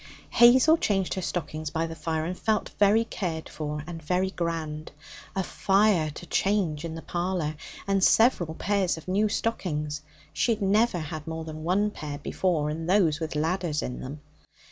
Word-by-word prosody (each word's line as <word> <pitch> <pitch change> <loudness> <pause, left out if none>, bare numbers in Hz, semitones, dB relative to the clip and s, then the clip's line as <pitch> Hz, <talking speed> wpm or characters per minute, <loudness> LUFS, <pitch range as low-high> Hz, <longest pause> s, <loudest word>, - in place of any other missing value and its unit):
Hazel 260 +7 +7
changed 195 - 0
her 190 - -3
stockings 155 -3 -3
by 165 +1 -1
the 165 - -6
fire, 160 0 -2
and 180 +2 -3
felt 215 +2 0
very 210 +2 +5
cared 165 -7 -4
for 150 -1 -5
and 165 -1 -7
very 180 +4 0
grand. 160 -4 -3 0.4
A 190 - 0
fire 195 -5 +2
to 155 +4 -9
change 180 -6 0
in 165 -1 -5
the 165 - -8
parlour! 175 -2 -2 0.3
And 195 -1 +1
several 185 -10 +4
pairs 195 -2 0
of 160 - -11
new 205 +3 +2
stockings! 150 -10 -2 0.3
She 235 - +2
had 215 - -14
never 210 +1 +3
had 155 -1 -6
more 160 0 -4
than 155 -1 -7
one 200 +5 +1
pair 150 -6 -6
before, 150 0 0
and 165 +2 -4
those 175 -6 +3
with 160 -2 -4
'ladders' 160 0 0
in 125 - -4
them. 140 +3 -7
170 Hz, 175 wpm, -27 LUFS, 155-195 Hz, 0.4 s, Hazel